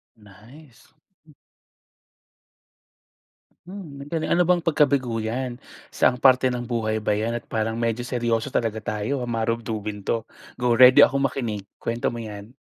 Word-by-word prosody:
Nice. 115 +7 -18 2.7
Mm, 150 -8 -9
'dale 160 -2 -1
ano 180 - +3
bang 180 +1 +3
pagkabigo 140 -8 +1
'yan? 120 +2 -3 0.3
Saang 125 -1 +1
parte 130 -1 +4
ng 120 -1 -4
buhay 110 -2 -1
ba 105 -1 0
'yan 115 +3 -2
at - - -26
parang 110 +1 -2
medyo 115 0 -1
seryoso 120 0 -1
talaga 110 -3 -1
tayo? 110 +6 -2
Marugdugin 110 -3 -3
to, 115 +2 -2 0.3
go 120 -1 +2
ready 125 +1 +8
akong 140 0 +5
makinig. 115 -7 -2 0.2
Kuwento 115 +1 -2
mo 120 - -6
'yan. 105 +1 -9
120 Hz, 130 wpm, -24 LUFS, 110-130 Hz, 2.7 s, ready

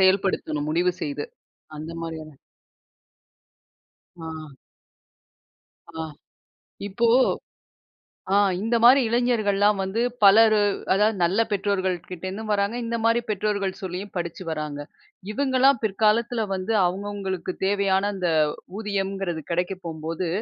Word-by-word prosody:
செயல்படுத்தணும் 185 -6 +1
முடிவு 175 +3 +2
செய்து 145 0 -3 0.5
அந்த 155 +2 -7
மாரியான 160 -2 -7 1.9
ஆ. 165 - -7 1.6
ஆ 160 -1 -6 0.9
இப்போ 230 +4 0 1.3
ஆ - - +5 0.3
இந்த 230 +2 +1
மாரி 260 +3 +8
இளைஞர்கலாம் 210 -4 +2
வந்து 190 +4 -2 0.2
பலர் 215 +2 +7 0.4
அதாது 210 +3 +3
நல்ல 185 +6 +2
பெற்றோர்கள் 195 -2 0
கிட்டேருந்தும் 190 +4 -6
வராங்க. 200 +2 +1
இந்த 230 0 -2
மாரி 230 +1 +3
பெற்றோர்கள் 200 -1 -1
சொல்லியும் 190 +2 -5
படிச்சு 170 +1 -4
வராங்க 150 -2 -4 0.5
இவங்கலாம் 265 -1 +3
பிற்காலத்தில 220 +2 +1
வந்து 190 +4 -2
அவங்கவங்களுக்கு 190 -1 -3
தேவையான 200 0 +2
அந்த 180 -2 -1 0.5
ஊதியம்ங்கிறது 195 -5 -2
கிடைக்க 180 +3 0
போகும்போது. 165 +2 -4
195 Hz, 100 wpm, -24 LUFS, 175-215 Hz, 1.9 s, மாரி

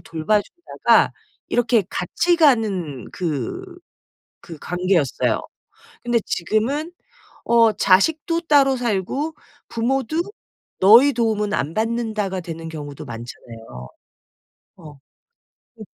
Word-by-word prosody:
돌봐 165 +6 0
주다가 345 0 +1 0.4
이렇게 235 -3 +2
같이 345 - 0
가는 205 - +1
그 180 - -4 0.8
그 165 -4 -10
관계였어요. 180 -5 0 0.6
근데 240 -1 +1
지금은 250 - -1 0.5
어 230 -2 +4
자식도 315 - +2
따로 280 -4 +4
살고 245 - -2 0.3
부모도 265 +6 -1 0.6
"너의 235 +9 +7
도움은 215 -3 0
안 155 -1 -2
받는다."가 220 -4 -2
되는 165 -1 -7
경우도 145 -3 -8
많잖아요. 115 - -10 0.9
어. 160 -5 -12 0.9
음. 215 - -7
215 Hz, 210 characters per minute, -21 LUFS, 165-260 Hz, 0.9 s, 너의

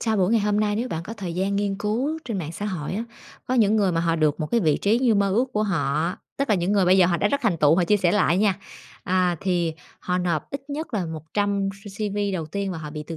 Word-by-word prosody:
sau 220 -1 0
buổi 190 -1 +2
ngày 230 - +4
hôm 210 0 +1
nay 210 -1 +1
nếu 240 +3 -2
bạn 165 -6 -4
có 210 - -7
thời 190 -5 -5
gian 195 +2 0
nghiên 200 -1 0
cứu 245 +10 -1
trên 225 -6 -3
mạng 160 -3 -5
xã 205 +5 -4
hội 180 -5 -4
á, 220 +4 -2 0.4
có 255 - +1
những 220 -3 +4
người 195 -4 +2
mà 165 - +1
họ 165 -1 +1
được 155 0 +1
một 155 - -1
cái 235 - +3
vị 155 -6 +2
trí 215 +3 +2
như 245 -4 +3
mơ 200 -1 +2
ước 240 +6 +2
của 215 - +1
họ, 165 -4 0 0.2
tức 275 0 -1
là 210 - +4
những 180 +1 0
người 200 -2 +3
bây 185 +2 +5
giờ 180 - +6
họ 175 -1 +1
đã 205 - +1
rất 280 - 0
thành 205 -7 +2
tựu, 150 +1 +5
họ 180 - +3
chia 210 +4 +3
sẻ 180 -3 +2
lại 185 -3 +3
nha. 200 -2 +2 0.5
À, 180 -1 +1
thì 175 -3 0 0.3
họ 180 0 -1
nộp 170 -4 -1
ít 275 - -4
nhất 305 -1 -4
là 195 -4 0
100 195 +6 -1
C 195 +1 -14
CV 205 0 -2
đầu 165 -4 -3
tiên 195 +4 -3
và 170 - -5
họ 155 -1 -7
bị 150 0 -6
từ 165 - -6
195 Hz, 290 wpm, -24 LUFS, 170-210 Hz, 0.5 s, giờ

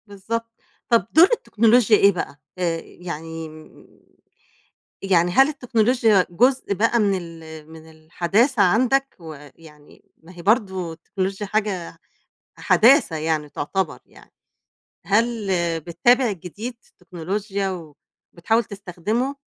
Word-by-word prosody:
بالضبط. 230 +3 -5 0.4
طب 235 -1 +3
دور 330 +4 +7
التكنولوجيا 230 - +3
إيه 200 0 +5
بقى، 165 -5 -6 0.2
آآ، 170 -2 -1
يعني 165 -2 -8
م 155 0 -16 1.2
يعني 180 -3 +2
هل 270 +9 +5
التكنولوجيا 235 -7 +2
جزء 250 +3 +1
بقى 230 +4 +1
من 205 -3 +2
ال 160 -2 -11
من 160 0 -13
الحداثة 180 - 0
عندك؟ 255 +8 +2
ويعني 150 -1 -14 0.2
ما 165 +3 -15
هي 170 - -10
برضو 190 -4 0
التكنولوجيا 195 +4 -4
حاجة 195 -5 -3 0.6
حداثة 250 - +4
يعني، 155 -1 -2
تعتبِر 190 +7 -3
يعني، - - -20 0.8
هل 220 0 0 0.3
بتِّابِع 215 - +2
جديد 200 +7 -8 0.2
التكنولوجيا 195 +3 -4 0.6
وبتحاول 225 +7 0
تستخدِمه؟ 205 +7 -4
195 Hz, 110 wpm, -22 LUFS, 165-230 Hz, 1.2 s, دور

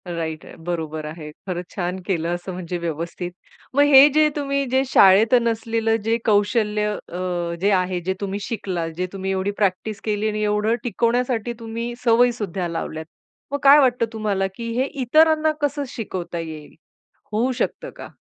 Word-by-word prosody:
Right 160 -2 -4
आहे - - -12
बरोबर 160 -3 -3
आहे. 155 -1 -7 0.2
खरंच 180 -1 -3
छान 180 -2 -2
केलं 170 -2 0
असं 175 +2 -7
म्हणजे 180 -1 -4
व्यवस्थित. 170 +2 -4 0.4
मग 285 - +5
हे 270 +2 +10
जे 305 0 +5
तुम्ही 280 -1 -1
जे 265 +1 +3
शाळेत 200 +5 +6
नसलेलं 225 -1 0
जे 225 +1 +1
कौशल्य 210 0 +2
अ, 175 -3 -4
जे 200 +2 +3
आहे 185 -1 +1
जे 190 +2 -1
तुम्ही 200 0 -3
शिकलात, 185 -8 -3
जे 185 0 -1
तुम्ही 190 0 -3
एवढी 190 +1 -1
प्रॅक्टिस 210 +2 -1
केली 210 0 0
आणि 215 0 -3
एवढं 210 +2 +1
टिकवण्यासाठी 240 0 0
तुम्ही 230 +1 -5
सवयी 240 +1 +5
सुद्धा 190 -5 -3
लावल्यात. 160 -1 -5 0.5
मग 285 - -1
काय 280 +2 +8
वाटतं 250 -3 +3
तुम्हाला, 205 -3 -1
की 230 -1 -5
हे 265 - +2 0.2
इतरांना 310 +4 +4
कसं 290 0 0
शिकवता 185 -7 -5
येईल? 155 -2 -8 0.6
होऊ 235 +5 +1
शकतं 380 - -3
का? - - -9
210 Hz, 165 wpm, -22 LUFS, 180-235 Hz, 0.6 s, हे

